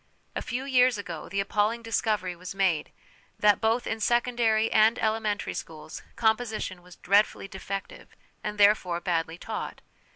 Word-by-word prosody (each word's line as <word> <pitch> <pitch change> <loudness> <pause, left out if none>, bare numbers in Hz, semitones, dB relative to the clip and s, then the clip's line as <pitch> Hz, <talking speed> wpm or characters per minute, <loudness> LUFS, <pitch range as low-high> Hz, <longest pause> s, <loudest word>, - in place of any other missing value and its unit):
A - - -2
few 255 +2 -4
years 255 -3 +4
ago 180 -6 -6
the 195 - -2
appalling 210 +4 0
discovery 215 -5 -1
was 180 +2 -8
made 185 -6 +1 0.5
that, 210 -1 +4
both 225 +2 +1
in 225 - -2
secondary 235 -1 +2
and 220 +1 +5
elementary 215 -2 -1
schools, 155 -1 -8
'composition' 220 -5 0
was 180 0 -15
dreadfully 200 +1 +2
defective, 195 0 -7 0.3
and, 210 0 -4
therefore, 200 -4 +4
badly 165 -2 -1
taught. - - -6
210 Hz, 140 wpm, -27 LUFS, 185-225 Hz, 0.5 s, and